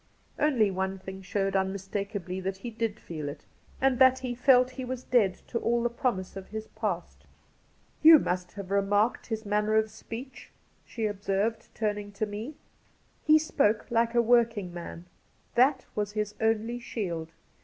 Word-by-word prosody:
' - - -25
Only 220 -8 +2
one 190 +1 -2
thing 190 0 -8
showed 195 +1 -1
unmistakably 195 0 -2
that 190 +1 -3
he 235 +5 -6
did 225 -1 -2
feel 155 -4 -5
it, 145 +1 -10 0.3
and 265 -2 +2
that 260 0 +7
he 255 -2 -4
felt 250 0 +4
he 260 0 -6
was 255 0 -5
dead 205 -7 +3
to 235 - -1
all 235 +1 +1
the 240 - +1
promise 235 -7 -2
of 195 -1 -7
his 220 +1 -6
past. 185 -6 -4 0.7
You 320 +1 +10
must 180 -8 -2
have 200 -2 -8
remarked 205 +3 +2
his 220 -1 -4
manner 210 +1 +1
of 220 0 +2
speech 230 +4 -9 0.2
?' - - -38
she 225 - -3
observed, 205 +2 -1
turning 205 -2 -2
to 210 +2 -1
me. 215 +8 -6 0.4
* - - -38
He 310 0 +8
spoke 255 -9 +1
like 230 0 +2
a 235 - +5
working 230 -6 +2
man. 170 0 -8 0.5
That 260 +2 +3
was 210 -1 -2
his 210 -1 -2
only 225 +2 +1
shield. 170 -9 -4
215 Hz, 175 wpm, -28 LUFS, 195-240 Hz, 0.7 s, You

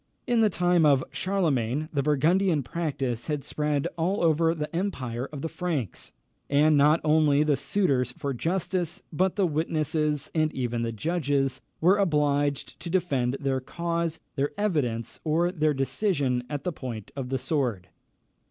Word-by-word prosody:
In 240 -1 +2
the 220 -1 +5
time 175 -2 +2
of 140 -3 +5
Charlemagne, 155 - 0
the 140 - +1
Burgundian 155 +3 +2
practice 135 -5 -3
had 150 -3 -2
spread 150 -2 -1
over 165 -2 +2
the 150 +1 -5
empire 130 - -3
of 145 -2 -7
the - - 0
Francs, 155 - -3 0.4
and 150 +2 +4
not 150 +3 +5
only 150 -2 +4
the 150 -2 +2
suitors 135 - +1
for 140 +2 -4
justice, 175 +4 -2
but 185 +4 +1
the 200 - +2
witnesses, 155 -2 -1
and 155 -1 +2
even 120 -2 -2
the 115 0 -1
judges, 140 - 0 0.2
were 185 +5 +5
obliged 145 -5 +1
to 170 - -6
defend 140 -8 0
their 135 -1 0
cause, 170 +4 -2 0.2
their 140 +1 +1
evidence, 145 - -1
or 170 +3 +1
their 155 -4 +1
decision 135 - 0
at 145 -2 -4
the 180 - -1
point 115 -8 -7
of 135 -2 -4
the 135 - 0
sword. 125 - -2
150 Hz, 150 wpm, -27 LUFS, 135-170 Hz, 0.4 s, the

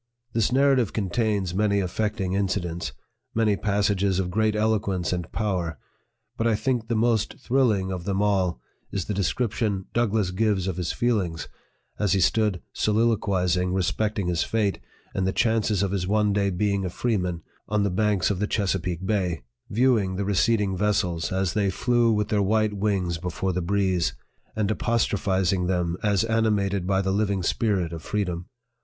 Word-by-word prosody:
This 115 -1 +1
Narrative 135 -4 +3
contains 100 -2 0
many 100 +1 +2
affecting 95 0 -1
incidents, 95 -4 -1 0.4
many 110 -2 +3
passages 100 -2 +1
of 90 -1 -1
great 110 +2 +1
eloquence 100 -5 0
and 90 -2 -4
power; 90 -7 -2 0.6
but 115 - +1
I 115 - +3
think 120 0 -1
the 115 - 0
most 115 -1 +1
thrilling 120 -8 +1
one - - -2
of 85 - -10
them 100 -1 -1
all 95 -8 +1 0.3
is 95 -3 -2
the 105 - -2
descrip 100 +4 0
tion 100 -4 -1
DOUGLASS 110 -5 +1
gives 100 -1 +1
of 95 -2 -2
his 90 -3 -1
feelings, 95 -10 -1 0.5
as 105 -3 +2
he 100 - +2
stood 105 0 +2
so 105 - 0
liloquizing 95 -5 +1
respecting 100 +3 0
his 85 -2 0
fate, 105 -3 0 0.3
and 95 -1 0
the - - +2
chances 110 -3 +1
of 100 - -1
his 95 -2 -1
one 105 0 +2
day 100 -1 +1
being 100 +1 0
a 90 - -2
freeman, 90 -5 -1 0.3
on 105 -1 +1
the 100 - 0
banks 105 +1 +1
of 95 - -2
the 105 - 0
Chesa 95 -4 0
peake 90 +1 -4
Bay 90 - -1 0.3
viewing 110 -5 +2
the 100 +1 -2
receding 105 0 +2
vessels 90 -5 0
as 95 -1 0
they 100 -2 +1
flew 120 +4 +2
with 105 -1 0
their 105 -2 +2
white 110 +1 +2
wings 95 -4 -1
before 90 +2 -2
the 90 - -1
breeze, 90 -6 0 0.4
and 110 -1 0
apostro 115 -2 0
phizing 95 -2 +1
them 90 -2 0
as 100 -2 +2
animated 105 -4 +1
by 95 0 +2
the 95 - 0
living 100 -2 0
spirit 95 -4 0
of 80 - -6
free 105 +5 -1
dom. 90 -1 -5
100 Hz, 175 wpm, -25 LUFS, 90-110 Hz, 0.6 s, Narrative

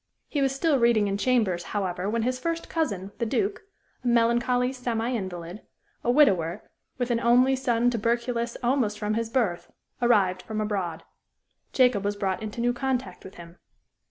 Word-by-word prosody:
He 290 - -2
was 270 -1 +2
still 285 -1 +2
reading 235 -3 +3
in 195 - -1
chambers, 210 -7 +1 0.2
however, 185 -1 -2
when 225 +1 0
his 255 +1 -1
first 335 +4 -3
cousin, 200 - -2
the 235 - 0
Duke, 405 - -1 0.4
a - - -3
melancholy 240 +2 +2
semi 240 -2 -2
invalid, 185 -4 -5 0.4
a - - -1
widower, 195 - +3 0.3
with 245 -1 -1
an 230 - +1
only 250 +3 +4
son 245 -2 +1
tuberculous 235 +1 -1
almost 240 -4 +1
from 210 0 -2
his 225 0 -1
birth, 225 -9 -1 0.3
arrived 200 -6 +3
from 215 +2 -5
abroad. 195 -6 -2 0.7
Jacob 250 -6 +3
was 205 0 -1
brought 195 -1 -2
into 215 +2 -5
new 245 +1 +2
contact 250 -7 -3
with 190 - -11
him. 170 0 -13
235 Hz, 165 wpm, -26 LUFS, 200-250 Hz, 0.7 s, only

